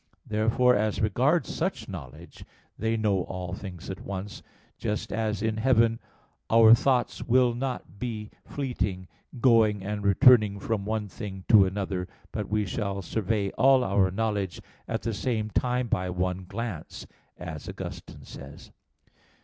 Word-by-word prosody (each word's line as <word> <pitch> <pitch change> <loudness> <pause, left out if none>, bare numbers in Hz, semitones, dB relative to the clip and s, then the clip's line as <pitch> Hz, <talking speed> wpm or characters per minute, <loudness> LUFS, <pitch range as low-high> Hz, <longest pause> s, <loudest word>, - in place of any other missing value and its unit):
Therefore, 115 +4 +3
as 105 0 0
regards 125 - +1
such - - -2
knowledge, - - -10 0.3
they 115 +1 -1
know 105 -4 +1
all 90 -1 -5
things 95 -3 -8
at 95 - -6
once: 100 0 -6 0.4
just 105 -1 -3
as 110 -1 -1
in 110 -1 0
heaven 115 -1 +3 0.5
"our 115 0 +8
thoughts 125 0 +2
will 125 0 +3
not 120 -7 -5
be 110 -3 -5
fleeting, 105 -9 -3 0.3
going 110 -5 +4
and 105 +1 -3
returning 105 -1 +5
from 100 0 -2
one 110 0 -2
thing 95 -1 -7
to 100 -3 +7
another, 95 -2 -3 0.2
but 105 -2 -4
we 105 0 +1
shall 100 -1 -3
survey 105 +1 -1
all 130 +1 +6
our 95 -2 +2
knowledge 100 -4 -2 0.3
at - - -3
the 115 - -1
same 110 -1 -2
time 125 +1 0
by 90 -4 -1
one 90 +1 -2
glance," 100 -3 -6 0.3
as 80 -3 -7
Augustine - - -8
says 70 +1 -11
(De - - -25
Trin. - - -33
105 Hz, 150 wpm, -27 LUFS, 95-115 Hz, 0.5 s, our